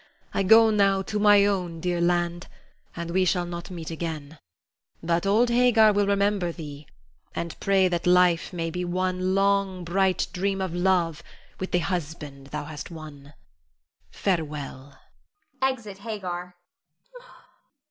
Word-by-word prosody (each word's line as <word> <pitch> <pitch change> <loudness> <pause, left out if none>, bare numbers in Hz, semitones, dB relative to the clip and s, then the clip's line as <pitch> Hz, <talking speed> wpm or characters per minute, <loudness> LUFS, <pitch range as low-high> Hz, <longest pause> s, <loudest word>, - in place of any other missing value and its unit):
I - - +1
go 220 +3 +6
now 195 -2 +3
to 210 +2 -3
my 205 -1 +6
own 180 -5 -1
dear 175 0 -1
land, 175 0 0 0.5
and 170 0 -5
we 185 +2 +2
shall 180 -1 +1
not 175 0 -7
meet 170 -3 -7
again; 160 -2 -6 0.6
but 170 +3 0
old 225 +5 +3
Hagar 235 -3 +5
will 205 0 +2
remember 200 -3 +1
thee, 150 -3 -9 0.5
and 170 0 -4
pray 195 -1 +3
that 175 -1 -2
life 180 -2 +4
may 165 -2 -3
be 180 +2 -3
one 185 +1 -1
long, 195 -2 +1
bright 185 +2 +1
dream 195 +1 -1
of 190 -3 -3
love 175 -3 +1 0.4
with 185 - -3
the - - +3
husband 155 -6 -4
thou 150 +1 -5
hast 150 -2 -8
won. 150 -3 -11 0.7
Farewell. 150 -6 -3 0.6
[Exit 235 -7 -2
Hagar. 180 -5 -5
180 Hz, 135 wpm, -25 LUFS, 165-195 Hz, 0.7 s, go